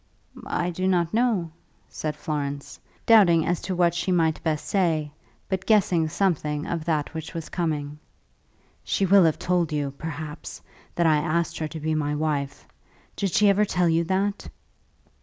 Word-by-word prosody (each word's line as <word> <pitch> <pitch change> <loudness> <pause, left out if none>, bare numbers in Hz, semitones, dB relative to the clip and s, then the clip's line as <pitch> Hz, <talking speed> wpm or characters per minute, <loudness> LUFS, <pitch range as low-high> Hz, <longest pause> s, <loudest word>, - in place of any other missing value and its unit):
"I 175 +1 -1
do 185 +2 -2
not 175 -2 +1
know," 220 -8 +1 0.4
said 155 -1 -4
Florence, 145 -2 -4 0.3
doubting 180 -8 +6
as 175 -1 -1
to 185 - -3
what 175 -1 +3
she 175 +2 -1
might 160 -3 +1
best 155 -2 -2
say, 160 -6 0 0.4
but 190 -1 -3
guessing 185 -7 +3
something 155 -5 -1
of 165 -2 -3
that 155 -3 -1
which 160 +2 -7
was 165 -1 -5
coming. 150 -4 -3 0.8
"She 195 - 0
will 195 -1 +6
have 160 - +2
told 175 -3 0
you, 145 -2 -1
perhaps, 155 -1 -6 0.4
that 170 - +1
I 155 -2 +4
asked 165 +2 -1
her 155 - -2
to 160 +1 -7
be 155 +1 -1
my 150 -1 -1
wife. 145 - -2 0.5
Did 195 -2 -1
she 210 +4 +4
ever 200 +1 +4
tell 180 -3 +1
you 165 +1 +2
that?" 195 +3 -1
165 Hz, 165 wpm, -25 LUFS, 155-180 Hz, 0.8 s, doubting